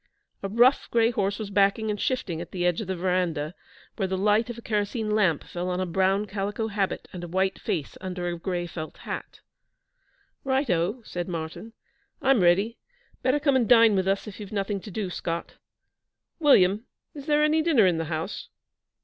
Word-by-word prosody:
A 195 - -3
rough 240 +6 +4
gray 230 0 +3
horse 200 -3 -1
was 210 -2 -6
backing 200 +2 +2
and 205 - -4
shifting 185 -10 -1
at 170 - -7
the 180 -1 -2
edge 175 +3 +1
of 210 - -6
the 190 - -2
verandah, 175 -4 -1 0.4
where 195 -4 0
the 190 0 -2
light 210 +4 +2
of 240 - -5
a - - -8
kerosene 215 +1 -1
lamp 195 -8 +2
fell 180 +1 -4
on 180 0 -1
a 185 - 0
brown 190 +3 +1
calico 205 +2 -3
habit 200 -2 -2
and 175 -1 -6
a - - -5
white 190 +2 0
face 150 -4 -3
under 180 -1 -4
a 175 - -2
gray 175 +1 -3
felt 160 -2 -7
hat. - - -7 1.0
'Right, 265 -1 +1
O,' 180 +8 0
said 175 -1 -4
Martyn. 165 +6 -6 0.5
'I'm 265 -5 +3
ready. 195 +7 +3 0.4
Better 260 +3 +2
come 285 -2 +2
and 240 -5 +2
dine 230 -3 +7
with 190 -1 +1
us 195 0 +1
if 210 -2 -9
you've 205 -2 -8
nothing 200 -1 -1
to 210 - -10
do, 200 -1 -3
Scott. 170 -1 -4 0.8
William, 215 - +4 0.3
is 285 0 -9
there 300 0 +3
any 310 +1 +3
dinner 300 - +4
in 175 -3 +2
the 165 - -2
house?' 160 +4 -4
195 Hz, 195 wpm, -26 LUFS, 180-225 Hz, 1.0 s, dine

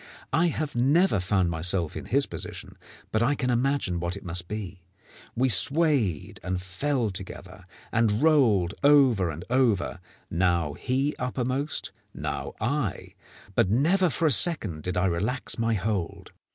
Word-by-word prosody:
I 165 +4 +3
have 155 -3 -3
never 140 - +3
found 90 -1 +1
myself 85 0 0
in - - -6
his - - +2
position, - - -5 0.4
but 110 - +1
I 145 +5 +2
can 125 -2 -1
imagine 120 -7 0
what 85 +2 -2
it - - -11
must 90 0 -4
be. 100 -3 -6 0.5
We 130 +3 +2
swayed 125 - +2
and 95 +1 -2
fell 115 +5 -2
together, 95 0 -8 0.3
and 115 +1 +1
rolled 115 - +3
over 135 -11 +5
and 80 +3 -7
over 120 -9 +1 0.3
now 85 -4 +1
he 135 - -1
uppermost, 130 +3 -2 0.2
and - - -8
now - - -4
I; 120 -1 -2 0.4
but 90 - +2
never 170 - +3
for 165 - -1
a 155 - +4
second 110 - +2
did 90 +3 -3
I 90 - +2
relax 100 +10 -1
my 115 0 +1
hold. 95 -4 -3
110 Hz, 150 wpm, -26 LUFS, 90-140 Hz, 0.5 s, over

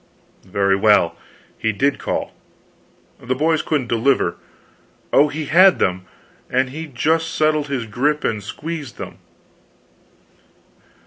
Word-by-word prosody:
"Very 100 +1 +2
well, 100 -4 +3 0.4
he 110 - +1
did 135 +7 0
call. - - -3 0.9
The 125 +1 -2
boys 160 +3 +1
couldn't 145 -5 -1
deliver. 120 -5 +1 0.8
Oh, 145 - +6
he 155 +1 -5
had 185 +5 +6
them 90 0 -1 0.4
and 130 0 0
he 160 +3 -6
just 160 +5 0
settled 155 -1 +1
his 135 -5 -3
grip 145 +7 0
and 110 -2 -1
squeezed 150 +6 -6
them. - - -8
140 Hz, 120 wpm, -20 LUFS, 110-155 Hz, 0.9 s, Oh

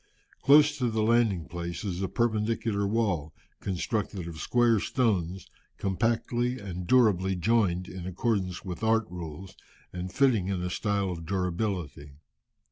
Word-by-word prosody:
Close 145 +1 +6
to 125 -2 +1
the 110 -1 0
landing 110 -7 +2
place 85 +3 -5
is 90 -2 -3
a 95 - 0
perpendicular 110 -2 0
wall, 100 -9 -1 0.2
constructed 100 -1 -2
of 85 -2 -7
square 120 -3 +3
stones, 95 -7 0 0.3
compactly 120 +5 0
and 90 -4 -6
durably 100 -7 +4
joined 90 -2 +1
in 90 -1 -7
accordance 95 -1 -1
with 90 +3 -6
art 110 0 +3
rules, 90 +2 -8 0.4
and 90 +1 -5
fitting 120 -8 +2
in 95 -2 -2
a 90 - -2
style 100 -2 0
of 85 -2 -6
durability. 90 -6 -2
100 Hz, 135 wpm, -28 LUFS, 90-115 Hz, 0.4 s, Close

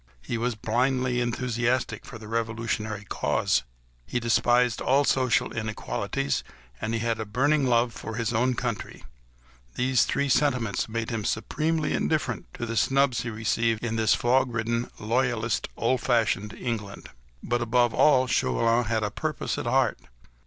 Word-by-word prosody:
He - - -3
was 120 +1 -1
blindly 125 +3 0
enthusiastic 120 +1 -1
for 115 - -8
the 110 -1 -11
revolutionary 110 -2 -2
cause, - - +1 0.4
he 100 - -2
despised 120 +1 +2
all 140 +2 +3
social 130 -3 +2
inequalities, 85 - -2 0.4
and 110 +1 -1
he 115 - -1
had 115 -1 -1
a - - -1
burning 135 +6 +1
love 120 -1 +2
for 115 - -7
his 115 0 -1
own 125 +3 +2
country: 120 -3 -4 0.7
these 125 -1 +3
three 140 - 0
sentiments 125 -6 +1
made 115 +1 -3
him 110 -2 -2
supremely 155 +10 -1
indifferent 140 -7 -1
to 120 - -4
the 115 0 -3
snubs 135 -2 +2
he 120 - -4
received 115 0 0
in 115 -1 -2
this 110 0 +3
fog 125 +1 +2
ridden, 115 +1 -1
loyalist, 115 0 0
old 125 +2 +1
fashioned 110 -4 +1
England. 110 -5 -5 0.3
But, 120 0 0
above 120 0 +2
all, 130 -1 +5
Chauvelin 115 - +2
had 110 0 0
a 105 - -1
purpose 155 +5 -3
at - - -4
heart. 125 -2 +2
120 Hz, 150 wpm, -26 LUFS, 110-125 Hz, 0.7 s, all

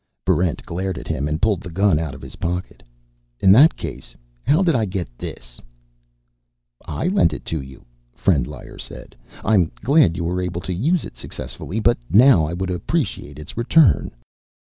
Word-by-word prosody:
Barrent 90 -3 +1
glared 95 +1 -3
at - - -8
him 70 +3 -2
and 75 +1 -2
pulled 105 -3 +1
the 90 - -8
gun 95 -1 +2
out 80 -5 -4
of - - -12
his - - -10
pocket. 90 +2 -4 0.6
"In 95 - +5
that 140 +11 +7
case, - - -8 0.2
how 155 - +3
did 170 -3 +3
I 115 -5 +1
get 90 - -5
this?" - - -9 1.2
"I 165 - -3
lent 180 - +3
it - - -7
to 80 - -1
you," 65 0 -13 0.3
Frendlyer 70 -11 -1
said. - - -10 0.3
"I'm 95 -6 +3
glad 135 - +4
you 85 - -2
were 90 +2 -1
able 90 -1 -3
to 90 - -4
use 155 - +1
it - - -11
successfully, 65 - -6
but 120 +2 +2
now 105 - +6
I 80 - -4
would 90 +1 -3
appreciate 75 -4 -3
its 75 0 -10
return." 120 - +4
90 Hz, 175 wpm, -21 LUFS, 80-110 Hz, 1.2 s, that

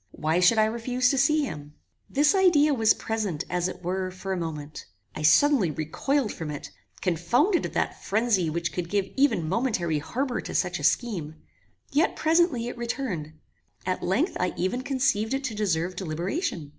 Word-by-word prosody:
Why 160 +2 0
should 180 +5 +5
I 215 - +5
refuse 245 +3 0
to 275 - 0
see 300 +3 +3
him? 150 - -7 0.3
This 290 +5 +3
idea 340 -6 +4
was 225 -4 +4
present, 210 -9 -3
as 180 0 0
it 180 0 -8
were, 185 +1 -2
for 185 +1 -5
a - - -1
moment. 155 -4 -6 0.3
I - - -5
suddenly 205 - +5
recoiled 210 - -1
from 160 -2 -6
it, 145 -1 -7 0.3
confounded 235 - +1
at - - -12
that - - -2
frenzy 210 -5 +1
which 170 0 -2
could 175 -2 -3
give 200 0 -1
even 265 - +2
momentary 180 - 0
harbour 245 - -2
to - - -7
such - - 0
a - - -7
scheme; 175 -11 0 0.6
yet 300 +3 +2
presently 320 -7 +2
it 245 - -6
returned. 225 - -3 0.5
At 185 - -1
length 225 - 0
I 180 0 -1
even 225 +8 -1
conceived 255 -4 0
it 275 - -3
to 260 -4 -3
deserve 185 -4 -1
deliberation. 175 - -3
205 Hz, 175 wpm, -26 LUFS, 170-260 Hz, 0.6 s, should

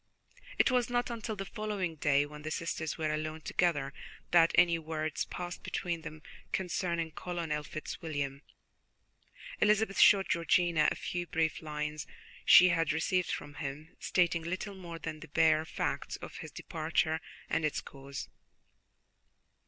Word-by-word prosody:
It - - +4
was 250 -1 +2
not 245 0 0
until 225 -1 -4
the 195 -1 -5
following 205 -4 -3
day, 145 -2 +2
when 150 0 -10
the 155 - -4
sisters 160 -1 -3
were 155 -2 0
alone 155 +1 -3
together, 145 -5 0 0.4
that 170 -1 +6
any 170 -1 +5
words 155 -1 -2
passed 175 0 -6
between 170 -3 -3
them 155 -1 -9 0.3
concerning 170 -3 -1
Colonel 165 -3 -3
Fitzwilliam. 145 -3 -4 1.2
Elizabeth 210 -1 +3
showed 195 -1 +7
Georgiana 170 -1 +3
a - - -3
few 175 -1 -3
brief 160 -2 0
lines 150 -1 -4 0.4
she 180 - +9
had 165 -2 +2
received 175 +3 +1
from 145 0 -4
him, 145 +2 -6
stating 170 -2 +2
little 185 +5 -4
more 175 -3 -8
than 155 -1 -5
the - - -10
bare 155 +1 +3
facts - - -2
of - - -9
his - - -7
departure 160 0 -1 0.3
and 165 - 0
its 155 - 0
cause. 135 0 -8
165 Hz, 145 wpm, -32 LUFS, 155-180 Hz, 1.2 s, she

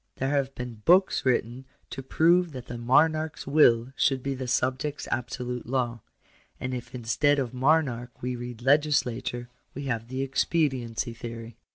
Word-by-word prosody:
There 135 +1 -1
have 140 -2 0
been 120 -3 -7
books 185 - +4
written 125 +1 0 0.3
to 135 - -5
prove 170 +5 +3
that 125 -2 -7
the 120 -1 -7
monarch's 155 +6 +2
will 130 -4 +4
should 135 -3 +1
be 140 - -1
the 130 -1 -5
subject's 130 +4 -1
absolute 125 0 -3
law; 120 -2 -1 0.6
and 130 0 -3
if 125 0 -6
in 120 - -6
stead 145 +5 +2
of 130 -3 -2
monarch 125 -3 +1
we 125 0 -3
read 120 -1 -7
legislature, 130 -4 +1 0.3
we 140 - -5
have 115 -4 -3
the 130 +2 -3
expediency 130 -4 0
theory. 115 -1 -8
130 Hz, 160 wpm, -27 LUFS, 120-140 Hz, 0.6 s, books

